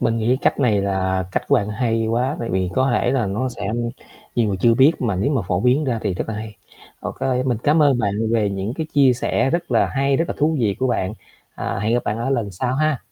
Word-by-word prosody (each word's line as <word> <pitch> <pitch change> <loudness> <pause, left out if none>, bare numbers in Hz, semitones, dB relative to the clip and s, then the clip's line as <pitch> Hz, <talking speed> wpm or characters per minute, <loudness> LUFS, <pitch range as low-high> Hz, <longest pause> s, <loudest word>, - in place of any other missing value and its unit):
Mình 115 0 +1
nghĩ 120 +4 +2
cách - - +1
này 110 -7 +3
là 95 -1 0
cách - - 0
của - - +4
bạn 105 0 +1
hay 115 0 0
quá 125 +5 0
tại 115 - -3
vì 95 -1 0
có 130 0 +2
thể 120 - +1
là 125 -4 +1
nó 105 +7 -1
sẽ 105 -5 -5 0.7
nhiều 115 -3 +2
người 95 - -1
chưa 115 +2 +4
biết 135 +6 +6
mà 110 -6 0
nếu 100 +10 0
mà 130 -6 +1
phổ 90 0 +1
biến 130 +6 +2
ra 120 -4 -1
thì 100 -4 -1
rất - - -3
là 110 - -3
hay. 105 -1 -7 0.4
OK - - -6 0.3
mình 120 -4 0
cám 155 +2 +4
ơn 140 -4 +4
bạn 100 -4 0 0.2
về 110 -3 +2
những 100 +5 -3
cái 160 0 -3
chia 135 -3 +5
sẻ 125 +2 0
rất 170 +1 -2
là - - +3
hay, 135 0 +1
rất 165 - +1
là - - -2
thú 155 +2 +2
vị 105 -4 +1
của 130 - +1
bạn. 95 -5 -1 0.4
À, - - -3
hẹn 110 +3 0
gặp 120 - 0
bạn 105 +2 -2
ở 125 +4 -2
lần 115 -6 -1
sau 125 +8 -2
ha. 155 -2 +1
115 Hz, 265 wpm, -21 LUFS, 105-135 Hz, 0.7 s, biết